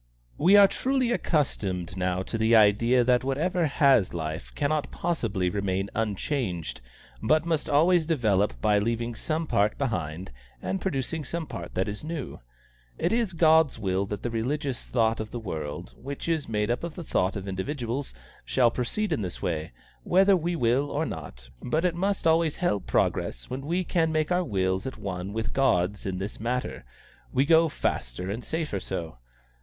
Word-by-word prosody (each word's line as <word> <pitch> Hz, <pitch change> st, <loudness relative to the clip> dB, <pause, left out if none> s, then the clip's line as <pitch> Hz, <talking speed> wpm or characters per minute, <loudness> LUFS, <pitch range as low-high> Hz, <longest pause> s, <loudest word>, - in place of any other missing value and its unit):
"We 190 Hz, +6 st, +6 dB
are 200 Hz, -1 st, +9 dB
truly 260 Hz, +2 st, 0 dB
accustomed 95 Hz, -, -1 dB
now 90 Hz, 0 st, -1 dB
to 115 Hz, -, -6 dB
the 110 Hz, +1 st, +3 dB
idea 115 Hz, +4 st, +5 dB
that 125 Hz, 0 st, +3 dB
whatever 160 Hz, +6 st, 0 dB
has 135 Hz, -, +3 dB
life 80 Hz, -1 st, -4 dB
cannot 150 Hz, 0 st, 0 dB
possibly 115 Hz, -, -1 dB
remain 95 Hz, 0 st, -1 dB
unchanged, 100 Hz, -, -2 dB, 0.4 s
but 155 Hz, +1 st, +3 dB
must 160 Hz, -3 st, -1 dB
always 160 Hz, +3 st, +4 dB
develop 105 Hz, -, +1 dB
by 105 Hz, -1 st, +4 dB
leaving 115 Hz, +2 st, -1 dB
some 155 Hz, +7 st, -2 dB
part 105 Hz, -7 st, +1 dB
behind 95 Hz, -, -3 dB, 0.3 s
and 190 Hz, -, -3 dB
producing 155 Hz, -2 st, -2 dB
some 165 Hz, +3 st, -4 dB
part 85 Hz, -, -8 dB
that 95 Hz, +2 st, 0 dB
is 105 Hz, +4 st, -5 dB
new. 155 Hz, -3 st, -5 dB, 0.6 s
It -, -, 0 dB
is 230 Hz, -5 st, +1 dB
God's 160 Hz, -3 st, +4 dB
will 95 Hz, -2 st, -1 dB
that 105 Hz, 0 st, -5 dB
the 120 Hz, -, -2 dB
religious 130 Hz, +3 st, -2 dB
thought 115 Hz, -2 st, +1 dB
of 110 Hz, 0 st, -4 dB
the 120 Hz, -, -5 dB
world, 75 Hz, -8 st, -5 dB
which 140 Hz, +3 st, -7 dB
is 160 Hz, -5 st, -1 dB
made 105 Hz, 0 st, 0 dB
up 120 Hz, -, -2 dB
of 170 Hz, -2 st, -5 dB
the 175 Hz, -, -6 dB
thought 95 Hz, -, 0 dB
of 100 Hz, -1 st, -5 dB
individuals, 120 Hz, +7 st, -3 dB, 0.3 s
shall 120 Hz, -3 st, +3 dB
proceed 165 Hz, -, -1 dB
in -, -, -1 dB
this 90 Hz, -3 st, -5 dB
way, 80 Hz, -2 st, -2 dB, 0.3 s
whether 195 Hz, +2 st, +4 dB
we 175 Hz, 0 st, -1 dB
will 130 Hz, +1 st, +2 dB
or 150 Hz, +3 st, -1 dB
not, -, -, -7 dB
but 155 Hz, +8 st, 0 dB
it 180 Hz, -, +2 dB
must 195 Hz, +2 st, -1 dB
always 165 Hz, -1 st, +3 dB
help 140 Hz, -, -1 dB
progress -, -, 0 dB
when 135 Hz, +2 st, -5 dB
we 175 Hz, +3 st, +1 dB
can 165 Hz, -2 st, +1 dB
make 155 Hz, +1 st, 0 dB
our 180 Hz, +1 st, +2 dB
wills 95 Hz, -, -1 dB
at 130 Hz, -, -6 dB
one 95 Hz, 0 st, -4 dB
with 110 Hz, +1 st, -3 dB
God's 100 Hz, -7 st, +1 dB
in 95 Hz, -1 st, -2 dB
this 100 Hz, +3 st, -5 dB
matter; 125 Hz, +3 st, -3 dB, 0.5 s
we 135 Hz, -, +2 dB
go 165 Hz, +1 st, +5 dB
faster 75 Hz, -, -2 dB
and 115 Hz, +4 st, -4 dB
safer 155 Hz, -11 st, -2 dB
so. 85 Hz, -8 st, -5 dB
120 Hz, 175 wpm, -27 LUFS, 95-160 Hz, 0.6 s, are